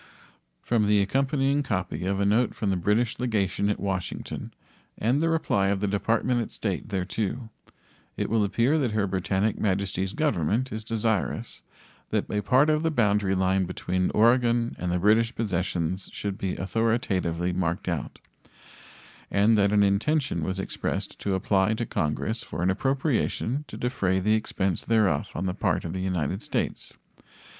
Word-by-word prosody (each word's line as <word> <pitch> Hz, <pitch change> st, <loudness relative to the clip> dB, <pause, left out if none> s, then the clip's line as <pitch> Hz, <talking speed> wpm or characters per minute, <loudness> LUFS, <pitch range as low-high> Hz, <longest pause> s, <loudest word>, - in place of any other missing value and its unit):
From 110 Hz, -3 st, +2 dB
the 105 Hz, 0 st, +4 dB
accompanying 135 Hz, +6 st, +1 dB
copy 95 Hz, -8 st, -2 dB
of 100 Hz, 0 st, 0 dB
a 100 Hz, -, +2 dB
note 110 Hz, +4 st, +2 dB
from 100 Hz, -3 st, -1 dB
the -, -, +1 dB
British 105 Hz, +7 st, +1 dB
legation 100 Hz, -4 st, 0 dB
at 105 Hz, -, -1 dB
Washington 95 Hz, -2 st, -4 dB, 0.5 s
and 125 Hz, +7 st, +1 dB
the 165 Hz, -, +2 dB
reply 130 Hz, -12 st, +1 dB
of 100 Hz, 0 st, +1 dB
the 105 Hz, -, 0 dB
Department 115 Hz, +4 st, +1 dB
of 115 Hz, -, -5 dB
State 100 Hz, -5 st, -3 dB
thereto 105 Hz, +4 st, -3 dB, 0.7 s
it -, -, -1 dB
will 110 Hz, -1 st, +2 dB
appear 120 Hz, +9 st, +2 dB
that 125 Hz, -7 st, 0 dB
Her 105 Hz, -2 st, +1 dB
Britannic 95 Hz, +2 st, 0 dB
Majesty's 95 Hz, -1 st, -1 dB
Government 130 Hz, -, 0 dB
is 110 Hz, 0 st, -4 dB
desirous 110 Hz, -2 st, -2 dB, 0.5 s
that -, -, 0 dB
a 105 Hz, -, 0 dB
part 130 Hz, +7 st, +4 dB
of 155 Hz, 0 st, +1 dB
the 165 Hz, -, +1 dB
boundary 105 Hz, -8 st, +2 dB
line 95 Hz, 0 st, +2 dB
between 90 Hz, 0 st, -1 dB
Oregon 120 Hz, +1 st, +3 dB
and 90 Hz, -1 st, -2 dB
the 90 Hz, -, +1 dB
British 110 Hz, +5 st, +3 dB
possessions 95 Hz, -3 st, -2 dB
should 100 Hz, -2 st, -4 dB
be 95 Hz, -2 st, -3 dB
authoritatively 95 Hz, -5 st, 0 dB
marked 90 Hz, +1 st, -1 dB
out, 85 Hz, -6 st, -3 dB, 1.1 s
and 105 Hz, +3 st, +4 dB
that 100 Hz, -1 st, +3 dB
an 105 Hz, -1 st, +4 dB
intention 110 Hz, -, +1 dB
was 95 Hz, +3 st, -2 dB
expressed 95 Hz, -, -3 dB
to 100 Hz, -2 st, -1 dB
apply 95 Hz, +2 st, +2 dB
to 115 Hz, -, -2 dB
Congress 105 Hz, +7 st, -1 dB
for -, -, -5 dB
an 95 Hz, -, +3 dB
appropriation 135 Hz, +3 st, 0 dB
to -, -, -9 dB
defray 100 Hz, -7 st, 0 dB
the 105 Hz, +3 st, +2 dB
expense 95 Hz, -4 st, -1 dB
thereof 105 Hz, -10 st, +2 dB
on -, -, -2 dB
the 90 Hz, -, -1 dB
part -, -, 0 dB
of 80 Hz, -, -4 dB
the 95 Hz, -, -3 dB
United 90 Hz, 0 st, -1 dB
States. -, -, -3 dB
105 Hz, 165 wpm, -26 LUFS, 95-115 Hz, 1.1 s, the